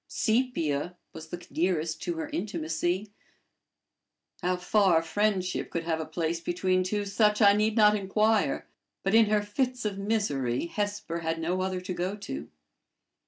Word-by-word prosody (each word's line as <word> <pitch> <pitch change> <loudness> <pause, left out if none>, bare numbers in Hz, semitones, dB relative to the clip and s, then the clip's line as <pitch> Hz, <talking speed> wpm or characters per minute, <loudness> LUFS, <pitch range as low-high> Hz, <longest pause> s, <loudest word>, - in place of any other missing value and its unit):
Sepia 180 - 0 0.2
was 160 0 -9
the 175 +1 -7
nearest 165 -2 0
to 345 - -2
her 320 -2 -4
intimacy: 180 - -2 1.3
how 180 +1 +1
far 180 -2 +3
friendship 185 +1 0
could 170 - -3
have 160 -1 -2
place 165 0 -1
between 185 +2 0
two 205 +3 -1
such 210 +1 +2
I 200 -2 +7
need 215 +1 +1
not 210 -1 +6
inquire; 210 +2 +1 0.4
but 195 - 0
in 225 -1 +6
her 210 0 +2
fits 250 +3 -2
of 200 -2 -2
misery 170 - 0
Hesper 205 -2 -3
had 165 0 -2
no 175 +3 -1
other 185 -1 -2
to 185 0 -4
go 180 +3 -2
to. 75 - -6
185 Hz, 150 wpm, -28 LUFS, 165-210 Hz, 1.3 s, I